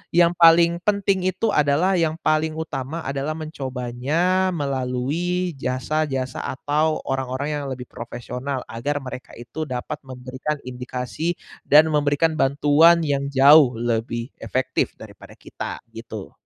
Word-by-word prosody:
yang 170 -1 +6
paling 170 0 +6
penting 195 -2 +1
itu 185 +4 0
adalah 155 +5 +2
yang 160 -1 +1
paling 155 0 +1
utama 160 0 -4
adalah 140 +3 -3
mencobanya 155 +5 -1
melalui 145 +6 -1
jasa-jasa 135 0 -2
atau 150 +4 0
orang-orang 135 +2 -2
yang 140 - -5
lebih 125 -1 -5
profesional, 125 +3 -5
agar 145 +6 -2
mereka 130 0 -8
itu 150 +6 -6
dapat 125 -1 -4
memberikan 130 +4 -4
indikasi 125 +6 -4 0.3
dan 155 +2 +6
memberikan 150 +2 +1
bantuan 150 +5 +5
yang 140 -2 0
jauh 140 -1 +6
lebih 115 +1 -2
efektif 130 0 -1
daripada - - -13
kita - - -7
gitu. - - -8
145 Hz, 120 wpm, -22 LUFS, 130-160 Hz, 0.3 s, yang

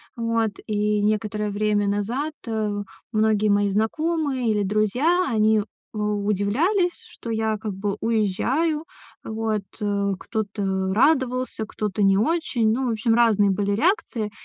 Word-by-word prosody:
Вот, 230 -2 0
и 210 -1 0
некоторое 210 0 0
время 205 0 +1
назад, 235 +10 -1
э, 215 -2 -1 0.3
многие 215 -1 +2
мои 205 0 +3
знакомые 265 - 0
или 210 -1 +1
друзья, 245 - +2
они, 215 -1 +3 0.3
у 210 -1 -1
удивлялись, 295 - +1
что 230 - -10
я 220 -1 0
как 215 -3 -4
бы 200 +1 -3
уезжаю. 255 - 0 0.4
Вот, 220 -1 -2 0.2
э, 200 -1 0
кто-то 195 -3 -2
радовался, 255 -3 +1
кто-то 210 -1 -3
не 195 -1 +4
очень. 235 -4 +1
Ну, 255 +2 0
в - - +1
общем, 225 +1 +1
разные 215 -4 +4
были 200 +1 0
реакции, 230 - 0
215 Hz, 135 wpm, -23 LUFS, 205-240 Hz, 0.4 s, не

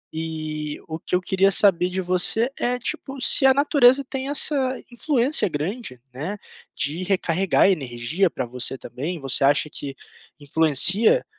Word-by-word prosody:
E 155 -2 -5
o 160 0 -6
que - - -3
eu 180 - 0
queria 190 +1 +1
saber 180 -4 +4
de 185 +1 -4
você 185 +7 +1
é, 245 +1 -1
tipo, 270 +2 -6
se 265 +1 +3
a 265 - +5
natureza 280 -2 +3
tem 270 0 -5
essa 290 +1 +3 0.4
influência 255 - 0
grande, 155 - -5
né, 180 +11 -6 0.4
de 160 +6 -3
recarregar 190 0 +1
energia 140 +3 -1
pra - - -5
você 125 +2 -3
também? 145 +10 -6
Você 135 0 0
acha 145 +2 +2
que 140 -2 -6 0.4
influencia 160 - +3
180 Hz, 150 wpm, -22 LUFS, 150-235 Hz, 0.4 s, a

